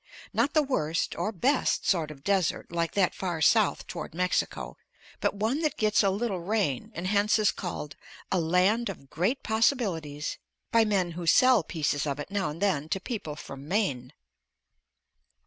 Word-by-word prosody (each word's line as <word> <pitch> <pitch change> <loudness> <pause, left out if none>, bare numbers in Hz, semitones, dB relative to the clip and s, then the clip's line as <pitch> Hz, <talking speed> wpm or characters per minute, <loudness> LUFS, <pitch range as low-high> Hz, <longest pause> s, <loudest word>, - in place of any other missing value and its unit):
Not 290 - +1
the 310 - +5
worst 165 - -1
or 215 - -1
best 255 - +1
sort 165 -5 +2
of 140 -3 -11
desert 195 -4 0
like 170 -1 -1
that 195 -3 +2
far 175 -4 -3
south 210 +6 +3
toward - - -7
Mexico, 180 +1 -1 0.4
but - - 0
one 225 +9 0
that 305 -3 0
gets 215 -1 +3
a 200 - +3
little 200 -1 -1
rain, 175 - -1
and 170 +2 -4
hence 205 +2 +3
is 215 -2 +3
called 155 -5 -6 0.4
a 185 - +2
"Land 185 +8 +2
of 140 -8 -9
Great 200 - 0
Possibilities" 195 - 0 0.3
by 230 -1 +5
men 190 -5 +1
who 170 0 -6
sell 255 +3 +6
pieces 150 -3 -1
of 140 0 -2
it 145 - -6
now 200 -5 0
and 150 +2 -7
then 165 -7 0
to 190 - 0
people 195 - -5
from 135 -1 -9
Maine. 145 - -1
185 Hz, 170 wpm, -28 LUFS, 160-215 Hz, 0.4 s, sell